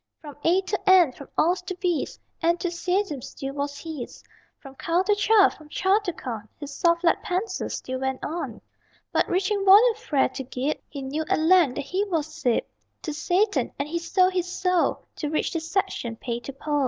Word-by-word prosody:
From 295 -3 -10
A 360 +3 +4
to 390 0 -2
And, 355 -8 +6
from 280 - -11
Aus 350 +4 +3
to 365 +1 -5
Bis 355 -5 -1 0.2
Enthusiasm 345 -1 0
still 270 +3 -6
was 285 0 -3
his; 310 -7 -7 0.3
From 270 -2 -12
Cal 335 +6 0
to 415 - +3
Cha, 415 0 +5
from 305 -1 -15
Cha 385 +6 +2
to 405 -4 -3
Con 230 -9 -7
His 290 -1 -7
soft 340 -1 +2
lead 335 - +3
pencil 380 +1 -2
still 260 0 -4
went 265 0 -2
on. 335 +3 -4 0.5
But - - +1
reaching 390 +2 +1
volume 415 +5 +7
Fra 335 - +1
to 260 - -7
Gib, 260 +3 -2
He 280 -2 -7
knew 290 +4 -2
at - - +3
length 320 -4 +4
that - - -2
he 370 +7 0
was 320 -5 -2
sib 275 -7 +1 0.4
To 310 - -3
Satan; 360 +7 +1
and 280 - -2
he 340 +3 -2
sold 370 +2 +2
his 360 -1 -1
soul 365 -1 0
To 300 - -2
reach 305 - -1
the 330 - 0
section 325 - -2
Pay 235 +1 -4
to 240 +3 -7
Pol. 295 +2 -1
335 Hz, 195 wpm, -25 LUFS, 285-370 Hz, 0.5 s, volume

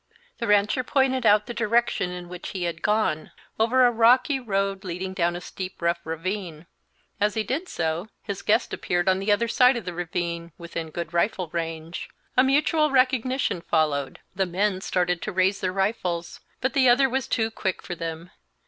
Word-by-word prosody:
The 235 - -2
rancher 205 +5 +3
pointed 260 -2 +2
out 210 0 +5
the 240 - -6
direction 235 -4 +1
in 180 -1 -7
which 180 0 -7
he 185 -3 -3
had 170 -1 -3
gone, 210 -7 +1 0.3
over 250 +3 +4
a 245 - +5
rocky 250 +5 +4
road 195 -4 -1
leading 185 +1 -4
down 175 -2 0
a 175 - -5
steep, 185 +1 -7
rough 170 0 +1
ravine; 165 0 -4 0.5
as 210 0 +1
he 220 - 0
did 290 - -3
so, 165 +3 -2 0.2
his 200 -3 -5
guest 220 +4 +1
appeared 175 0 -1
on 190 0 +3
the 195 +2 0
other 230 +3 +2
side 250 +1 +4
of 225 - -6
the 180 - -4
ravine, 170 -1 -3
within 165 -1 -6
good 170 +1 -5
rifle 175 0 0
range. 165 0 -5 0.3
A 255 - +6
mutual 300 +3 +3
recognition 260 -6 +1
followed; 145 -5 0 0.2
the 190 0 0
men 190 +2 0
started 180 -2 0
to 215 - -3
raise 190 +1 +1
their 185 - 0
rifles, 185 -3 -2 0.2
but 260 - 0
the 260 -2 +5
other 265 +3 +5
was 265 0 -2
too 225 -1 0
quick 190 -4 -3
for - - -5
them. 165 +1 -6
195 Hz, 185 wpm, -25 LUFS, 170-235 Hz, 0.5 s, A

